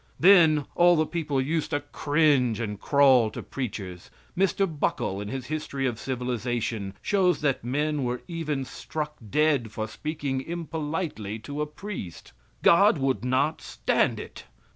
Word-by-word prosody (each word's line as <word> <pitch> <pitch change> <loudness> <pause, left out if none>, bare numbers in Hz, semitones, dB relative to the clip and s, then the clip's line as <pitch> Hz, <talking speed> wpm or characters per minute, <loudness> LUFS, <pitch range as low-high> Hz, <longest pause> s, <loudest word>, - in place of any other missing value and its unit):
Then 160 -5 +6
all 175 0 +5
the 155 -1 +2
people 150 -5 -2
used 155 +4 -1
to 145 - 0
cringe 145 -5 +2
and 105 -3 -4
crawl 135 -5 +5
to - - -7
preachers. 100 -9 -6 0.3
Mr. 195 +1 +2
Buckle, 145 - -2
in 105 - -5
his 130 +2 -5
history 145 -2 -3
of 120 -4 -2
civilization, 120 -5 -3
shows 185 -5 +2
that 140 -5 0
men 145 +3 -1
were 125 0 -3
even 155 -6 -3
struck 150 +2 -5
dead 145 -5 +2
for 110 0 -4
speaking 140 +1 -3
impolitely 155 - -4
to 145 +1 -4
a 150 - -1
priest. 150 - -8 0.3
God 200 +2 +6
would 135 -2 0
not 130 +5 +1
stand - - 0
it. - - -9
145 Hz, 145 wpm, -26 LUFS, 125-155 Hz, 0.3 s, Then